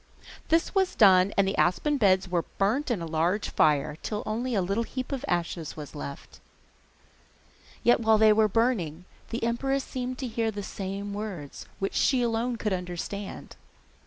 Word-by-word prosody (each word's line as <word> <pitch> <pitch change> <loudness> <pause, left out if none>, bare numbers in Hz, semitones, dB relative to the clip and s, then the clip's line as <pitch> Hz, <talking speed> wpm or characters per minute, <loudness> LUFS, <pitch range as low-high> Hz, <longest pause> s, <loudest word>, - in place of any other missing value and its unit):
This 330 +1 +2
was 380 -2 +1
done 190 -2 +6
and 200 -1 +4
the 195 - -1
aspen 285 - +2
beds 190 -5 +3
were 175 -2 -1
burnt 230 +10 +1
in 210 -8 -1
a - - -3
large 165 +6 0
fire, 150 0 +2
till 210 -1 -3
only 235 +3 -2
a 195 - +2
little 200 +5 0
heap 255 +3 -5
of 275 -1 -3
ashes 170 -2 -2
was 150 -2 -8
left. 140 -2 -8 1.4
Yet 240 - +5
while 220 -1 +4
they 215 0 +6
were 215 0 +4
burning 190 -8 0 0.2
the 230 - -4
empress 270 +4 0
seemed 255 0 -4
to 260 - -4
hear 225 -1 -1
the 205 -2 -5
same 195 +1 -5
words, 200 -9 -6
which 195 - -2
she 255 -3 +2
alone 235 +1 0
could 215 -3 -2
understand. 180 +2 -5
210 Hz, 170 wpm, -27 LUFS, 180-240 Hz, 1.4 s, done